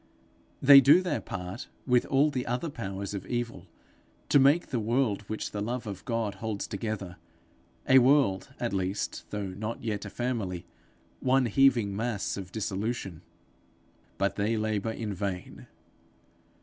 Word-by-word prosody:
They 140 0 +10
do 150 +7 +6
their 180 - -1
part 90 +4 -6 0.2
with 125 -2 +3
all 145 +1 +3
the 125 -3 -3
other 125 +7 -2
powers 100 -4 -5
of 100 - -5
evil 120 -7 -3 0.6
to 145 - +6
make 140 +6 +4
the 125 - 0
world 115 -1 +1
which 110 - -3
the 105 - -4
love 120 +3 -3
of 100 -3 -6
God 115 -4 -1
holds 110 -3 -3
together 100 -6 -5 0.7
a 130 0 +8
world 130 -7 +3
at - - -2
least, 95 +1 -2
though 105 -1 -3
not 110 +5 -5
yet 110 -3 -2
a 100 - -6
family 110 -8 -3 0.5
one 130 0 +3
heaving 120 -4 +3
mass 110 -1 -2
of 95 -2 -7
dissolution. 100 -4 -3 1.0
But 100 0 0
they 105 +2 +1
labour 110 0 -1
in 110 -2 -4
vain. 95 -2 -5
110 Hz, 150 wpm, -28 LUFS, 100-125 Hz, 1.0 s, They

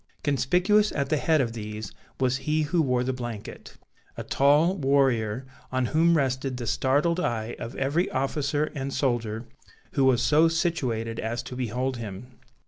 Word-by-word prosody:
Conspicuous 180 - +2
at 140 -2 -1
the 155 - +2
head 155 +2 +2
of 115 -3 -2
these 105 -2 -6 0.3
was 130 -1 +2
he 155 +3 0
who 165 +3 +1
wore 125 -4 +1
the 130 +1 -1
blanket; 120 -4 -7 0.4
a - - -4
tall 150 +6 +3
warrior 135 - +1 0.3
on 130 -1 +1
whom 165 +1 +4
rested 130 -2 -1
the 120 - -5
startled 145 +9 +1
eye 115 -9 -2
of 115 +3 -6
every 145 +7 0
officer 145 +2 -1
and 140 -2 -4
soldier 120 -4 -1 0.5
who 135 - +1
was 130 -2 +4
so 155 +2 +5
situated 130 -10 -1
as 120 +2 -3
to 125 - -8
behold 125 +1 -2
him. 115 +3 -8
130 Hz, 160 wpm, -26 LUFS, 120-150 Hz, 0.5 s, so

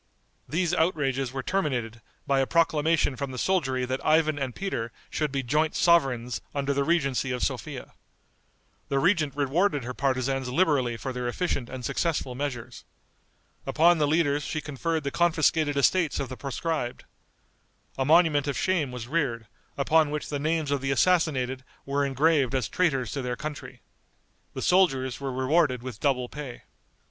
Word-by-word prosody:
These 170 +3 0
outrages 135 -7 0
were 135 0 -4
terminated 125 - -2 0.2
by 140 -1 +2
a 135 - +1
proclamation 160 -3 +2
from 140 +1 -4
the 130 - -7
soldiery 130 -8 0
that 130 +2 -3
Ivan 155 -1 +3
and 130 -3 -3
Peter 120 -12 -3 0.2
should 150 -2 -1
be 135 -1 -2
joint 150 +5 +1
sovereigns 135 -8 +2
under 140 0 0
the 140 0 +1
regency 140 -5 +1
of 125 -1 -2
Sophia. - - -4 1.0
The 140 - 0
regent 155 -2 +2
rewarded 145 - +1
her 125 +2 -5
partisans 130 -1 -1
liberally 130 -5 +1
for 130 +2 -5
their 125 -1 -3
efficient 130 -2 -2
and 130 -2 -6
successful 155 -6 -1
measures. 130 -3 -5 0.8
Upon 170 +1 +4
the 150 - +3
leaders 145 -2 +2
she 155 - -3
conferred 155 +2 -3
the 140 - -2
confiscated 160 -3 +2
estates 155 +3 +2
of 135 - -3
the 130 - -6
proscribed. 140 -1 -3 0.9
A 135 - 0
monument 150 -1 +4
of 140 - -1
shame 170 -8 0
was 125 -2 -6
reared, 130 -7 -1 0.3
upon 155 +2 +3
which 150 0 -4
the 145 - -2
names 155 0 0
of 140 -2 0
the 135 - -2
assassinated 135 -5 +1 0.2
were 140 +1 0
engraved 140 -1 +2
as 125 -6 0
traitors 135 - 0
to 140 - -3
their 125 -1 -3
country. 150 0 -7 0.7
The - - -4
soldiers 135 -9 +2
were 135 -1 -3
rewarded 130 0 +1
with 125 -4 -7
double 130 -4 +1
pay. 140 -3 -8
140 Hz, 160 wpm, -27 LUFS, 130-160 Hz, 1.0 s, Upon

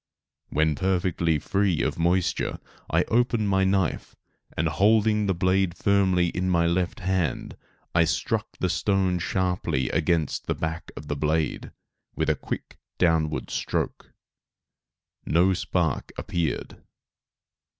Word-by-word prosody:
When 80 0 +2
perfectly 90 -2 +1
free 95 +3 0
of - - -2
moisture, 90 +2 +1 0.3
I - - +3
opened 115 -3 +1
my 95 0 +3
knife, 95 -3 0 0.4
and 80 - +1
holding 105 +3 +3
the 95 - +1
blade 95 0 +1
firmly 95 -2 +2
in 90 +2 -2
my 85 -2 +3
left 90 +4 0
hand, 90 -6 -1 0.4
I 85 0 +4
struck 75 -1 -1
the 90 - 0
stone 95 0 +1
sharply 90 -8 -1
against 80 -2 0
the - - 0
back 80 +1 -4
of - - -7
the 75 - -2
blade, 75 +2 -1 0.5
with - - +1
a - - 0
quick - - -6 0.2
downward 80 -3 +1
stroke. - - -3 1.2
No 90 +4 +4
spark 85 -4 -1
appeared. 85 -4 -3
90 Hz, 125 wpm, -25 LUFS, 80-95 Hz, 1.2 s, I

